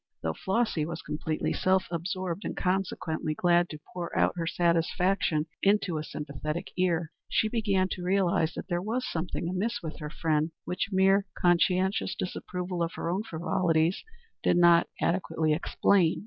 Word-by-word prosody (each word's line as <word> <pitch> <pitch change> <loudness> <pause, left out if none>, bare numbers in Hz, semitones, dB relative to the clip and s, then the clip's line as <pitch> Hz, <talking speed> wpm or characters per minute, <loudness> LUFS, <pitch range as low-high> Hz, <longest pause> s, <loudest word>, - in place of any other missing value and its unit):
Though 80 0 0
Flossy 190 - 0
was 170 +2 -5
completely 155 +1 -2
self 185 0 +2
absorbed, 180 +2 -3
and - - -4
consequently 180 -4 -1
glad 175 +1 +3
to 155 - -7
pour 175 -2 -4
out - - +3
her 165 -2 -2
satisfaction 170 -1 +1 0.2
into 195 -5 +2
a - - -4
sympathetic 150 +2 -5
ear, 170 -3 +1 0.2
she 220 - +2
began 205 -4 +1
to 185 - -4
realize 180 -3 +2
that - - -6
there 175 -2 -1
was 230 +6 -2
something 170 0 -3
amiss 205 +5 -2
with 160 +1 -6
her 150 -1 -5
friend 155 0 0
which 180 - -2
mere 195 +1 +4
conscientious 185 +2 +2
disapproval 180 -1 -4
of 165 0 -1
her 170 - -2
own 190 +3 0
frivolities 165 -2 0 0.4
did - - +3
not 175 -1 +6
adequately 165 -3 +1
explain. 175 +1 +2
175 Hz, 155 wpm, -28 LUFS, 165-190 Hz, 0.4 s, not